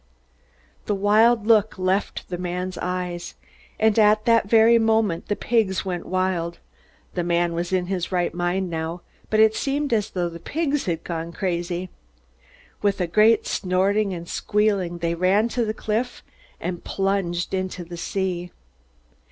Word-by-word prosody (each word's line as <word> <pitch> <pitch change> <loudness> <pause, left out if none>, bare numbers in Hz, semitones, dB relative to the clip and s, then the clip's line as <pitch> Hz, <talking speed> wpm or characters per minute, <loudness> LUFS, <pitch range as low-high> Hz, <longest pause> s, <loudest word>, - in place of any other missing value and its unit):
The 205 - +1
wild 215 +3 +4
look 215 -2 +3
left 185 +2 -1
the 175 -1 -4
man's 180 +1 -3
eyes. 180 -1 -4 0.4
And 220 0 +3
at 215 0 +4
that 230 -4 +3
very 230 +1 +6
moment 220 -6 +1
the 205 - 0
pigs 215 -6 0
went 180 -2 -4
wild. 185 -2 -1 0.6
The 175 - -1
man 170 0 +1
was 175 +2 -3
in 185 -1 +1
his 185 -1 -3
right 175 -2 0
mind 175 +2 -1
now, 165 +2 -4 0.3
but 215 - +2
it 220 0 +6
seemed 285 -1 -1
as 210 -3 +1
though 180 -2 -1
the 170 0 -8
pigs 295 - -1
had 170 -2 -2
gone 165 -1 -4
crazy. 175 0 -3 0.9
With 200 -1 +1
a 180 - +1
great 215 +5 +4
snorting 195 +3 +1
and 170 -2 -6
squealing 200 -5 0
they 170 0 -1
ran 190 +6 +2
to 235 -1 0
the 215 - -1
cliff 225 +3 -3 0.4
and 175 0 -4
plunged 195 -3 -1
into 185 -1 -3
the 175 +1 -9
sea. 180 0 -3
185 Hz, 155 wpm, -23 LUFS, 175-215 Hz, 0.9 s, very